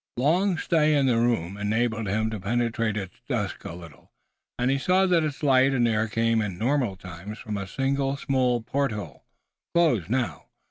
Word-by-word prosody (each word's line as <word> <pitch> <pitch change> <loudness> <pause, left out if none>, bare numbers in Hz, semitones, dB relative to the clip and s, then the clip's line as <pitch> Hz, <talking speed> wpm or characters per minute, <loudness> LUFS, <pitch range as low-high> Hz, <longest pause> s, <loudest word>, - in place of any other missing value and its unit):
Long 175 +8 +2
stay 155 -2 +2
in 140 -2 +3
the 120 -3 +3
room 105 -6 0
enabled 110 +1 0
him 110 +3 0
to 110 - -4
penetrate 115 +1 -1
its 95 0 -7
dusk 105 -7 -2
a - - -5
little, 85 -4 -13 0.5
and 125 +2 +1
he 135 - +1
saw 185 +5 +3
that 175 -3 +3
its 150 -1 -4
light 135 -1 +4
and 120 -2 +3
air 110 -1 +1
came 115 +1 +1
in 100 -5 -3
normal 125 -2 0
times 95 +3 -9
from 105 -1 -5
a 100 -1 -4
single 135 +4 -1
small 130 -3 +1
porthole, 110 - -3 0.5
closed 125 - +3
now. 125 +1 -1
120 Hz, 180 wpm, -26 LUFS, 105-135 Hz, 0.5 s, light